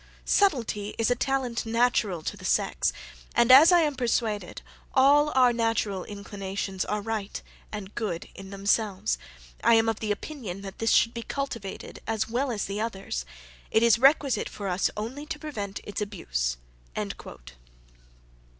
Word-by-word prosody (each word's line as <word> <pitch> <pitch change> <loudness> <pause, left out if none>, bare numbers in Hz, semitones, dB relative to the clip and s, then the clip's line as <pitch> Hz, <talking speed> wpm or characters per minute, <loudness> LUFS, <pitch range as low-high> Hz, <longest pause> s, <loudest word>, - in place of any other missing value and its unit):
Subtilty 230 - +1
is 225 +1 +2
a - - +4
talent 260 -2 -1
natural 225 -6 +1
to - - -3
the - - -13
sex; - - +1 0.4
and 235 +1 +5
as 290 +7 +10
I 350 -1 +6
am 300 -2 +1
persuaded, 230 -4 -1 0.3
all 290 +3 +5
our 250 -2 +5
natural 225 -5 0
inclinations 200 -2 -4
are 210 0 -2
right 220 -2 -3 0.3
and 205 -2 -7
good 185 -7 -3
in 195 0 -10
themselves, 200 +1 0 0.4
I 235 - +6
am 225 0 +4
of 225 0 -1
opinion 205 - -4
this 225 - +1
should 230 - +4
be 235 - -4
cultivated 230 -7 -5
as 220 -1 0
well 255 +4 -1
as 210 -4 -2
the 200 +2 -3
others: 195 - -3 0.4
it 220 - +3
is 235 0 +5
requisite 275 0 +4
for 200 - -6
us 180 +1 +1
only 260 +8 -5
to 315 - -4
prevent 210 -11 -5
its 205 - -5
abuse." - - -2
225 Hz, 150 wpm, -27 LUFS, 200-250 Hz, 0.4 s, as